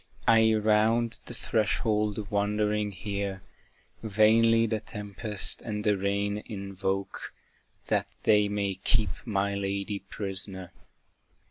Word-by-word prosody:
I 110 -1 +6
round 110 +2 +2
the 120 - -6
threshold 105 -1 0
wandering 105 0 +1
here, 100 0 -4 0.6
Vainly 115 +2 +4
the 110 -1 -1
tempest 105 0 -4
and 105 -3 -4
the 105 -1 +3
rain 100 +1 -1
invoke, 100 -2 -3 0.5
That - - +1 0.2
they 105 -1 +5
may 100 -2 -2
keep 110 -2 +2
my 100 -3 0
lady 100 +1 -2
prisoner. 95 -2 -5
105 Hz, 105 wpm, -28 LUFS, 100-110 Hz, 0.6 s, I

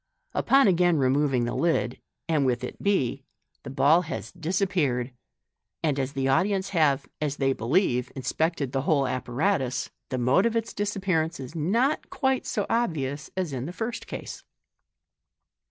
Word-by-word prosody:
Upon 275 -2 +4
again 175 -2 +4
removing 135 -1 +2
the 120 - -2
lid, 160 -8 0 0.3
and 155 -3 +2
with 125 -1 0
it 125 - -6
b, 140 -10 +1 0.4
the - - -8
b 135 0 -2
ill 160 +5 +6
has 165 -1 -6
disappeared; 165 -8 0 0.7
and 145 -3 +1
as 135 +1 -2
the 135 -1 -1
audience 190 +8 +2
have, 145 -7 +2 0.2
as 145 -2 -1
they 135 -1 +2
believe, 125 - +1
inspected 145 +1 -1
the 135 - 0
whole 140 -1 +2
apparatus 130 +3 -1 0.2
the 130 - -2
mode 130 - +3
of 230 - -2
its 230 0 -1
dis 205 0 -2
appearance 170 -5 0
is 130 +1 -7
not 225 - +1
quite 265 -1 0
so 205 - -1
obvious 150 - -1
as 180 -6 -1
in 130 +1 -3
the 175 - -6
first 225 +4 -4
case. - - -7
150 Hz, 160 wpm, -26 LUFS, 135-190 Hz, 0.7 s, ill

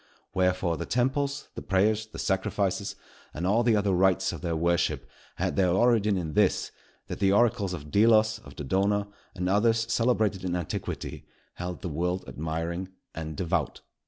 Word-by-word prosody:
Wherefore 90 -2 +1
the - - -5
temples, 140 +4 0
the - - -6
prayers, 105 +3 +1
the - - -11
sacrifices, 95 0 -1 0.4
and 85 - -3
all 105 +5 +3
the 120 -2 +3
other 100 -2 +2
rites 95 +1 +2
of 85 - -7
their 85 -2 -1
worship, 80 -4 0 0.3
had - - -1
their 95 -2 +3
origin 105 +1 +3
in 80 -4 -3
this, - - +2 0.3
that - - -6
the 95 0 +3
oracles 105 -2 +2
of 75 -4 -7
Delos, 110 0 +4
of 70 -10 -14
Dodona, 100 +7 0 0.3
and 90 0 -2
others 115 +4 +3
celebrated 110 -5 +1
in 90 -1 -1
antiquity, 85 -3 -5 0.3
held 90 0 -6
the - - -2
world 90 +4 -2
admiring 80 +4 -3 0.3
and 80 -2 -6
devout. 85 - -1
95 Hz, 160 wpm, -27 LUFS, 85-110 Hz, 0.4 s, Delos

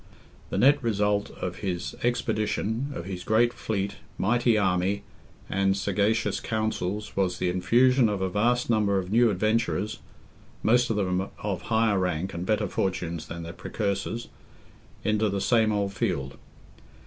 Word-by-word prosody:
The - - -2
nett 140 +7 +5
result 105 -3 +1
of 90 -1 -5
his 90 -4 -3
expedition, 115 +1 -1
of 85 - -5
his 90 -2 -5
great 120 +4 +3
fleet, 100 -2 -3 0.2
mighty 120 +2 +2
army, 95 +1 +1 0.4
and 95 0 +1
sagacious 105 +3 +1
counsels, 105 -2 -2
was 95 -2 0
the 90 - 0
infusion 120 +7 +4
of 100 -2 -1
a 95 - 0
vast 120 +6 +1
number 105 -4 +2
of 95 0 -3
new 120 +1 +5
adventurers 110 +1 0 0.6
(most 120 +2 +4
of 110 - +1
them 95 -1 0
of 100 -4 -2
higher 110 -3 +2
rank 90 0 -1
and 85 +2 -4
better 105 -1 +1
fortunes 85 -3 -2
than 85 0 -6
their 85 +1 -7
precursors), 110 +3 -3 0.7
into 110 0 +2
the 100 0 -1
same 110 +1 +3
old 100 -1 -1
field. 70 -6 -2
105 Hz, 150 wpm, -27 LUFS, 95-110 Hz, 0.7 s, nett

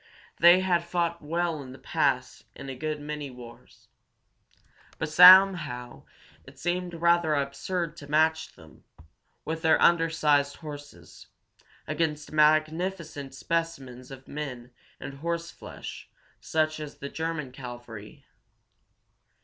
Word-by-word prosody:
They 175 +2 +7
had 175 -2 +1
fought 170 -1 -2
well 165 0 -2
in 130 -2 -10
the - - -12
past 130 -2 -1
in 135 - -9
a 135 - -5
good 155 +2 -4
many 150 -1 -6
wars. 120 -2 -14 1.1
But - - -3
somehow 170 -8 +6 0.4
it 130 +1 -16
seemed 175 +3 -3
rather 170 -2 +2
absurd 155 +5 -3
to 145 - -11
match 160 +1 +1
them, 80 -3 -18 0.6
with 160 +1 -4
their 160 -1 +4
undersized 160 -4 +3
horses, 145 -2 -11 0.6
against 150 -2 -2
magnificent 155 -1 0
specimens 135 -6 -4
of 135 -1 -12
men 130 -5 -7 0.3
and 140 0 -8
horseflesh 170 +1 -6 0.3
such 155 -1 -1
as 150 -1 -8
the 140 - -6
German 160 -4 -4
cavalry. 120 -4 -10
155 Hz, 115 wpm, -27 LUFS, 135-170 Hz, 1.1 s, They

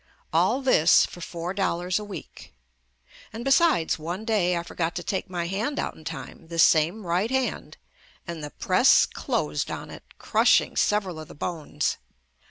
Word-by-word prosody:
All 270 - +2
this 175 -11 +5
for 175 - -11
four 170 +1 -5
dollars 185 -1 -1
a - - -6
week. 205 -2 -10 0.8
And 230 +3 -7
besides 275 - +3
one 175 +7 -5
day 185 -6 +1
I 170 - -3
forgot 170 -1 -3
to 175 - -4
take 190 +1 -3
my 175 -2 -3
hand 215 +11 -2
out - - -2
in 160 - -16
time, 165 +1 -8
the 170 0 -7
same 165 +5 +4
right 180 +6 0
hand, 265 0 -2 0.5
and 170 -3 -6
the 150 - -5
press - - +4
closed 75 0 -2
on - - -6
it, - - -10 0.2
crushing - - +3
several 195 -6 0
of 155 - -9
the - - -13
bones. 160 +1 -3
175 Hz, 170 wpm, -25 LUFS, 165-210 Hz, 0.8 s, this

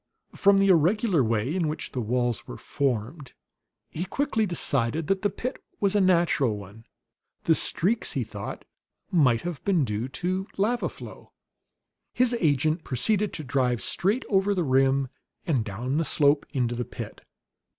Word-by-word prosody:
From 200 0 +4
the 195 0 +3
irregular 180 - +3
way 115 +4 0
in 175 -4 0
which 155 +1 -4
the 125 - -3
walls 120 0 -1
were - - -7
formed, 130 +1 -3 0.6
he 165 - -3
quickly 225 +2 0
decided 150 -3 0
that 195 +4 0
the 205 - +2
pit 250 +6 -5 0.2
was 200 -1 +1
a 205 - +3
natural 170 - +2
one. 100 +3 -12 0.6
The 165 - +4
streaks, 200 +7 0
he - - -1
thought, - - -7 0.5
might 130 - +3
have 175 -4 -5
been 180 -8 +2
due 105 +2 -3
to 185 +7 -2
lava 230 +5 +1
flow. - - -12 0.8
His 250 -1 +3
agent 155 +1 +1
proceeded 205 - +1
to 155 - -3
drive 125 -3 0
straight 210 +8 0
over 200 0 +2
the 180 - +1
rim 135 -1 +2 0.4
and 140 - +1
down 120 +8 -2
the - - +1
slope 145 -1 +2
into 120 -3 0
the 120 0 -2
pit. - - -8
155 Hz, 160 wpm, -26 LUFS, 125-195 Hz, 0.8 s, From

